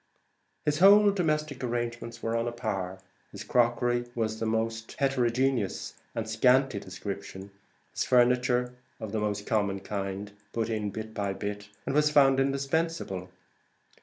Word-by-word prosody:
His 150 +1 +1
whole 205 +2 +8
domestic 155 -7 -1
arrangements 120 -1 -3
were 115 0 0
on 115 +1 0
a - - -1
par: 100 -6 -3 0.3
his - - -7
crockery 120 0 +2
was 110 -2 -1
of - - -13
a - - 0
most 115 0 -2
heterogeneous 130 -4 0 0.2
and 110 -1 -2
scanty 125 +1 +3
description; 95 0 -7 0.4
his - - -1
furniture 125 0 +3 0.3
of 110 -3 -6
the 110 - -1
most 105 -1 -2
common 100 -3 0
kind, 100 0 -4 0.2
put 115 0 -1
in 105 -2 -1
bit 110 +1 -6
by 100 -2 -2
bit, 105 +1 -5 0.2
as - - -1
it - - -3
was 150 +1 +4
found 135 -3 +5
indispensable. 135 - -1
115 Hz, 150 wpm, -28 LUFS, 105-135 Hz, 0.4 s, whole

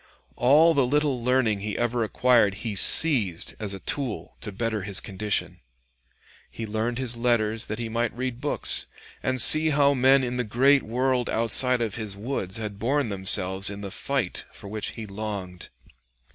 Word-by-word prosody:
All 150 +7 +4
the 140 -3 +2
little 145 -3 -1
learning 120 -4 +1
he 105 +1 -5
ever 120 0 -1
acquired 115 -3 +2
he 110 - -3
seized 105 - +4
as 105 -3 -5
a 100 - -6
tool 130 +1 -4
to 105 - -6
better 110 +1 -3
his 100 0 +2
condition. 105 +1 -3 0.9
He 115 - -7
learned 110 +3 -3
his 125 -2 -1
letters 115 -2 -1
that 110 - -5
he 115 -1 -5
might 115 +1 -2
read 125 -1 -5
books - - +2 0.3
and 130 0 -2
see 155 +6 +8
how 140 -1 +2
men 135 +1 +3
in 125 0 -3
the 125 - -1
great 130 +5 +2
world 125 +2 -1
outside 120 +2 +1
of 115 -2 -3
his 100 -2 -6
woods 105 -4 -5
had 105 -2 -7
borne 135 +2 -1
themselves 95 0 0
in 100 0 -8
the 100 -1 -7
fight - - -3
for - - -12
which 105 +1 -4
he 110 - -8
longed. 100 -3 -7
115 Hz, 175 wpm, -24 LUFS, 105-130 Hz, 0.9 s, see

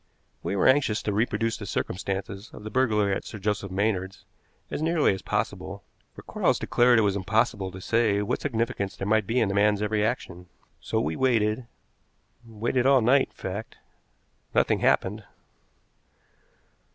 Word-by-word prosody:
We - - -2
were 100 - +3
anxious 130 -5 +3
to 105 - -1
reproduce 115 +1 0
the 105 - -8
circumstances 95 +3 -4
of - - -10
the 110 - -7
burglary 105 -5 +2
at - - -3
Sir - - -8
Joseph 105 0 -2
Maynard's 95 -1 -2 0.5
as - - -3
nearly 160 -7 +2
as 95 - -6
possible, - - -3 0.3
for - - -11
Quarles - - +1
declared 120 0 +3
it 110 - +4
was 100 -1 +1
impossible 100 0 0
to 95 0 -9
say 110 +1 +1
what 105 - -2
significance 115 -6 -2
there 95 - -4
might 110 +1 +2
be 120 +2 +1
in 115 - +2
the 100 - -2
man's 105 0 +3
every 105 0 0
action. 95 -6 -3 0.3
So - - -2
we 80 +2 -1
waited 115 -2 +1 0.8
waited 115 +3 -1
all 135 -2 +5
night, 130 +4 +4
in - - -33
fact. 100 +4 -6 0.8
Nothing - - +3
happened. 105 +3 +1
105 Hz, 165 wpm, -26 LUFS, 100-115 Hz, 0.8 s, all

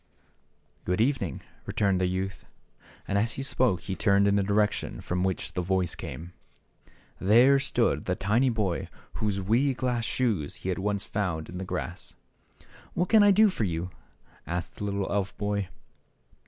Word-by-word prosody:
" - - -41
Good 90 +2 -1
evening! 130 +3 0
" - - -31
returned 100 -3 +1
the 90 - +2
youth. 95 +1 -4 0.6
And 100 - +1
as 115 +3 0
he 135 - -4
spoke 125 -8 +1
he 95 - -4
turned 100 0 +3
in 100 - +3
the 100 - +3
direc 105 +1 +2
tion - - -5
from 90 +1 -1
which 95 -1 -2
the 90 - -1
voice 90 0 0
came 85 +7 -7 0.9
There 120 +8 +5
stood - - +1
the - - 0
tiny 115 +7 +2
boy 105 -7 -1 0.3
whose 105 -2 0
wee 120 +8 +2
glass 125 -2 -1
shoes 110 - -1
he - - 0
had 95 - -1
once 100 0 -1
found 90 -6 -3
in 90 - -6
the 95 - -4
grass. 90 0 -5 0.3
" - - -24
What 180 +1 0
can 220 -2 +6
I 205 - +7
do 215 +2 +6
for 185 - -2
you? 90 -1 -2 0.3
" - - -30
asked 85 0 -4
the 105 - -4
little 100 -1 -1
elf 100 0 -1
boy. 100 -2 -1
100 Hz, 185 wpm, -27 LUFS, 90-115 Hz, 0.9 s, I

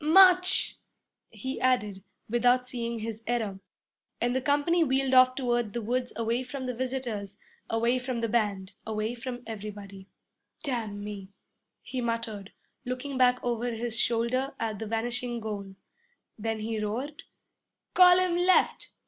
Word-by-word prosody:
'March!' 365 +3 +6 0.5
he 260 0 -5
added, 210 -7 +1 0.2
without 245 +2 +3
seeing 235 -2 -3
his 225 0 -5
error. 220 -5 -1 0.6
And 245 +1 0
the 260 - +1
company 290 +5 +3
wheeled 265 -2 +1
off 255 0 +7
toward 240 -5 0
the 235 - -2
woods 250 +3 -1
away 230 +2 0
from 260 +1 -6
the 250 - -2
visitors, 235 -6 -3 0.3
away 235 +3 +2
from 250 -2 -3
the 230 - +1
band, 205 -4 0
away 215 +1 -2
from 245 0 -6
everybody. 200 -3 -8 0.6
'Damn 225 -7 -2
me!' 200 -2 -7 0.5
he 255 - -4
muttered, 230 -4 -3 0.3
looking 255 +2 -4
back 250 -1 +4
over 240 0 -1
his 230 0 -2
shoulder 240 +4 0
at 220 -3 -2
the 220 - -4
vanishing 240 +2 -2
goal. 200 -3 -5 0.6
Then 220 0 -3
he 220 0 -2
roared, 255 +9 -3 0.7
'Column 360 -1 +6
left! 365 +1 +3
240 Hz, 140 wpm, -28 LUFS, 220-255 Hz, 0.7 s, off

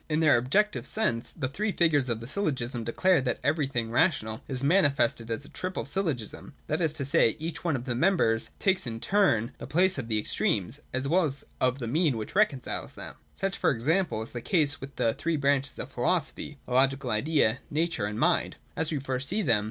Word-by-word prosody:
In 155 0 +1
their 155 -4 +5
objective 200 - +1
sense, 180 - 0
the 145 -6 -3
three 210 +11 -2
figures 150 -8 +2
of 115 -1 -2
the 115 - -7
syllogism 130 - -2
declare 180 +8 +2
that 125 -2 -1
everything 135 -6 0
rational 110 -5 +1
is 130 -1 -3
manifested 140 -8 +2
as 115 +5 -3
a - - -13
triple 185 0 -4
sj'llogism; 150 - -4
that 155 +3 -1
is 160 -3 +2
to 140 - -2
say, 130 -4 +3
each 160 +2 -5
one 165 -4 +1
of 125 -1 -4
the 125 - -1
members 120 -6 +2
takes 190 -8 +1
in 115 -1 -4
turn 120 - +2
the - - -7
place 180 0 +2
of 120 - -5
the 110 -2 +1
extremes, 105 +3 0
as 130 +1 -2
well 175 +4 +3
as 140 -1 -4
of 130 0 +2
the 125 - -5
mean 145 +1 +1
which 110 - -6
reconciles 185 -11 0
them. - - -8 0.2
Such, 195 0 -2
for - - +3
example, 150 - 0
is 110 - -9
the 120 - -5
case 150 - +2
with 135 +1 -9
the 115 - +1
three 165 +4 -1
branches 140 0 +1
of - - -6
philosophy; 150 +2 -1
the 125 - -5
Logical 135 0 +2
Idea, 130 0 +2
Nature, 155 -9 -1
and 105 +1 -5
Mind. - - +2 0.2
As 160 - -1
we 155 - 0
first 130 0 -2
see 210 +3 0
them. 115 - +3
140 Hz, 210 wpm, -28 LUFS, 120-165 Hz, 0.2 s, their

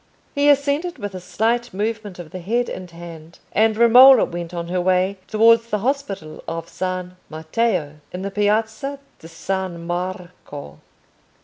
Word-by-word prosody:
He 285 0 +3
assented 285 +5 +1
with 205 -1 -6
a 185 - -5
slight 230 +4 -1
movement 210 -1 -3
of 175 -3 -10
the 185 - -6
head 235 +7 -1
and 185 -1 -7
hand, 170 -1 -11
and 220 0 +2
Romola 250 +3 +8
went 170 0 -6
on 170 -1 -5
her 180 0 0
way 185 +2 +1
towards 230 +1 +4
the 210 - 0
hospital 205 - -3
of 165 0 -4
San 185 -1 -4
Matteo, 160 -1 -1
in 180 +1 -6
the 200 - -3
Piazza 220 +7 0 0.2
di 165 - -12
San 185 -1 -4
Marco. 175 -4 -6
190 Hz, 150 wpm, -21 LUFS, 175-230 Hz, 0.2 s, Romola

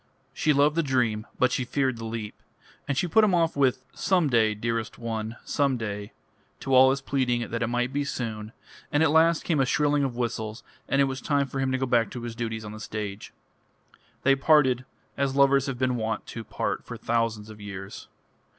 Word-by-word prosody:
She 155 - +1
loved 145 +1 +3
the 165 - +3
dream, 120 -6 0
but 125 - +3
she 125 - 0
feared 130 0 0
the 115 - -5
leap; 110 -2 -6 0.5
and 140 - -1
she 180 - +1
put 220 +6 +4
him 200 -4 +4
off 165 -1 +1
with 130 -2 +1
"Some 180 -7 +1
day, 110 -3 +3
dearest 115 0 -3
one, 110 -1 -4
some 140 -3 +1
day," 105 -2 -5 0.5
to 135 - -2
all 130 +1 +8
his 135 +1 0
pleading 125 -4 -1
that 115 +1 -2
it 115 - +1
might 125 +2 -1
be 145 +1 0
soon; 110 -6 -4 0.4
and 145 +2 +3
at 160 - +3
last 160 +1 +4
came 160 -4 0
a 135 - +4
shrilling 145 +1 +2
of 130 -3 -2
whistles, 115 -1 -3 0.3
and 140 - +3
it - - +6
was 135 -1 -2
time 145 -2 +1
for 135 +1 -5
him 135 -1 0
to 130 - +1
go 130 - -1
back 120 -4 +2
to 120 - -7
his 120 -1 -5
duties 115 -2 -4
on 105 - -7
the 110 - -9
stage. 105 -1 -6 0.9
They 135 0 +5
parted 135 -3 +3 0.3
as 135 -1 0
lovers 140 -1 +4
have 135 -2 -3
been 130 -1 0
wont 110 0 -2
to 115 - -6
part 110 - -3
for - - -8
thousands 115 -2 -1
of 105 -1 -12
years. 100 -1 -8
125 Hz, 215 wpm, -26 LUFS, 110-140 Hz, 0.9 s, all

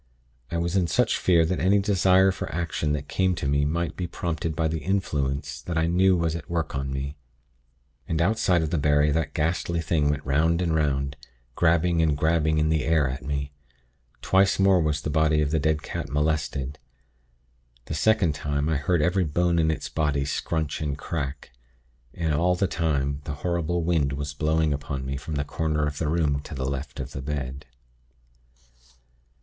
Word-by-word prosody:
I 85 - -2
was 85 +2 -1
in 90 -3 +2
such - - +1
fear 85 -3 +4
that 90 +2 -1
any 95 +5 +4
desire 95 -1 +4
for - - -5
action 80 -2 -1
that 75 -1 -4
came 95 +2 +1
to 75 - -3
me 70 +1 +2
might 85 +3 -1
be 90 - -3
prompted 80 -2 -3
by 80 -1 +1
the 80 0 -2
Influence 75 -6 -2
that 85 -2 -4
I 80 - +2
knew 90 +2 +3
was 85 -1 0
at 80 -4 -7
work 80 -2 -2
on 70 0 -3
me. 70 +2 -4 0.9
And 80 - -1
outside 90 -2 +2
of 80 - -3
the 85 - +1
barrier 75 0 +3
that 75 -2 -1
ghastly 85 +2 0
thing 80 -2 +1
went 75 0 -2
'round 80 +5 +2
and 85 -3 0
'round, 70 -2 0 0.4
grabbing 85 +2 +2
and 75 -3 +2
grabbing 80 0 +2
in 75 0 +2
the 80 -1 +1
air 80 -4 +2
at 65 0 -5
me. 70 +1 -3 0.7
Twice 95 +1 +3
more 95 -2 +4
was 75 -1 0
the 75 - -3
body 80 0 +3
of 75 -1 +1
the 80 - +2
dead 75 +1 0
cat - - -5
molested. 75 -2 -1 1.1
The - - -5
second 95 0 +2
time, 75 +1 -2
I 80 - +1
heard 75 +3 +1
every 90 +3 +2
bone 85 +2 +1
in 80 -1 +2
its 80 - -2
body 75 -3 0
scrunch 80 +1 -2
and 75 -2 -2
crack. 70 -4 -5 0.6
And 80 -3 -1
all 90 +4 +2
the 100 - +1
time 70 -5 -1
the 70 - -4
horrible 85 0 0
wind 80 -5 +1
was 70 +1 -4
blowing 80 +1 +1
upon 70 -2 -4
me 70 +1 -3
from 75 +3 -5
the 70 0 -1
corner 75 0 -1
of 75 0 -4
the 80 - -1
room 75 -3 +1
to 75 - -7
the 65 -1 -3
left 70 +1 -4
of 65 +1 -5
the 65 - -6
bed. 70 -1 -5
80 Hz, 190 wpm, -25 LUFS, 70-85 Hz, 1.1 s, fear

